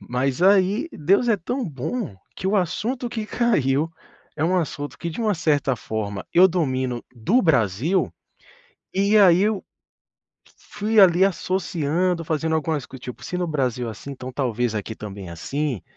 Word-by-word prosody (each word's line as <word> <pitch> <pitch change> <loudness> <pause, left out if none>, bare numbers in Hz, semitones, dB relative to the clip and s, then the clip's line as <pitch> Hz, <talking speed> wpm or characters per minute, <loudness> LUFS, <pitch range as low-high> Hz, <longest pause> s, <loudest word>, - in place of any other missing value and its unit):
Mas 130 +5 -1
aí, 200 - +4
Deus 195 +10 +2
é 220 - +4
tão 245 +7 -3
bom, 155 - -4 0.2
que 185 - -5
o 200 +2 +2
assunto 225 +8 -1
que 225 -2 -4
caiu 160 - +1 0.5
é - - -2
um 180 +3 +2
assunto 145 -4 -3
que 170 - -4
de 160 - -6
uma 215 -2 +2
certa 145 -5 +1
forma 105 -3 -4
eu 185 +2 +7
domino 130 -8 -1
do 180 - +2
Brasil, 135 - +2 0.8
e 200 +3 +3
aí 185 -2 +6
eu 210 -2 0 0.8
f - - -24 0.3
fui, 215 +1 +4
ali, 185 -1 +6
associando, 180 -2 0
fazendo 160 0 -1
algumas 155 -3 -1
co 130 - -10
tipo, 125 0 -9
se 180 - -4
no 180 0 -1
Brasil 125 -6 -1
é - - -3
assim, 110 +6 -9
então 130 -1 -8
talvez 120 -3 -1
aqui 110 +1 -4
também 100 -3 -8
é - - -7
assim 135 - -3
160 Hz, 170 wpm, -23 LUFS, 130-190 Hz, 0.8 s, eu